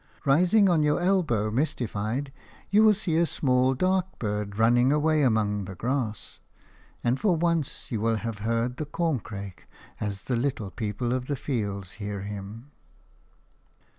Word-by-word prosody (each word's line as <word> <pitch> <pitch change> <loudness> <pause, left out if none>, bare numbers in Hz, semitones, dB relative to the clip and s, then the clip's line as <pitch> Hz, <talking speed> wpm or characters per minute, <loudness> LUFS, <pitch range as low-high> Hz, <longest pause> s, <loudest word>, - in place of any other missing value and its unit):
Rising 180 +9 +4
on 170 -4 +3
your 150 0 +2
elbow, 165 - +1
mystified, 125 0 -2 0.4
you 205 +2 +6
will 215 -1 +6
see 175 -5 0
a 170 - +4
small 130 -2 +2
dark 185 +4 0
bird 105 -2 -3
running 120 +3 +4
away 155 +1 +2
among 105 -6 +1
the 95 - -8
grass; 120 0 -3 0.6
and 120 +3 +1
for 195 -5 +2
once 165 -5 -1
you 110 -3 -1
will 115 0 +2
have 110 -1 -4
heard 115 +3 -1
the 155 - -4
corncrake 110 - -3 0.3
as 100 -2 -3
the 125 - -1
little 115 -5 -2
people 110 +5 -2
of 130 0 -2
the 145 - -1
fields 100 -9 -3
hear 100 -1 -4
him. 105 +6 -8
125 Hz, 150 wpm, -27 LUFS, 105-155 Hz, 0.6 s, you